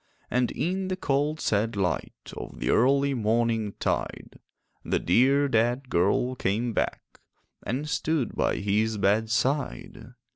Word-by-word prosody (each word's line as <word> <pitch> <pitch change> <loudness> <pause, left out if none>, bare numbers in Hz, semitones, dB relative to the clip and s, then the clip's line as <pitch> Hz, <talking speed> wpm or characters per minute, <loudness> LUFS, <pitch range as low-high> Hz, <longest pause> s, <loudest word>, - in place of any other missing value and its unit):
And 125 0 +2
in 185 +2 -2
the 185 - -1
cold 150 -2 0
sad 110 -1 0
light 95 -3 -3
Of - - -8
the - - 0
early 140 +3 +3
morningtide, 115 -2 -1 0.4
The - - 0
dear 135 +9 +3
dead 120 +2 0
girl 100 +8 +2
came 115 0 -1
back - - -3 0.4
And 135 +5 -3
stood 150 -4 -1
by - - +1
his 105 +2 0
bedside. 110 +6 -1
120 Hz, 120 wpm, -26 LUFS, 110-140 Hz, 0.4 s, early